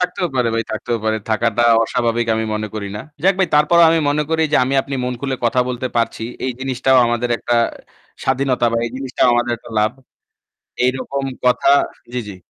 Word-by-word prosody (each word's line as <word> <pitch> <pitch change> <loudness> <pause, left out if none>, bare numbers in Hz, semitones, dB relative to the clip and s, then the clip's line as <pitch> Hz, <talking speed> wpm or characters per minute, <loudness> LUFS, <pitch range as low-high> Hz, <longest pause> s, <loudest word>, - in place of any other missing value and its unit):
থাকতেও 180 0 -1
পারে 125 -2 +2
ভাই 115 - 0
থাকতেও 115 +2 -2
পারে। 110 0 +1
থাকাটা 115 +1 +1 0.2
অস্বাভাবিক 120 0 0
আমি 110 0 -1
মনে 110 0 -2
করি 100 -2 -4
না। - - -5 0.2
যাক 195 +1 +5
ভাই 190 -3 +2
তারপরেও 160 +3 +5
আমি 165 - +3
মনে 145 +1 +1
করি 160 0 +2
যে - - +5
আমি 135 - -1
আপনি 140 - -6
মন 125 - -2
খুলে 135 -1 -2
কথা 120 +2 +2
বলতে 125 0 -3
পারছি। 115 -1 -1 0.2
এই 130 - 0
জিনিসটাও 130 0 +1
আমাদের 120 +1 -1
একটা 120 - -1 0.7
স্বাধীনতা 130 -2 +1
বা - - +1
এই - - -6
জিনিসটাও 130 -2 0
আমাদের 120 0 +1
একটা 120 - -14
লাভ। 110 +2 +2 0.9
এইরকম 130 +2 -1 0.2
কথা 125 +2 +3 0.4
জ্বি, 125 - -2
জ্বি। 100 - -8
125 Hz, 190 wpm, -19 LUFS, 115-135 Hz, 0.9 s, যাক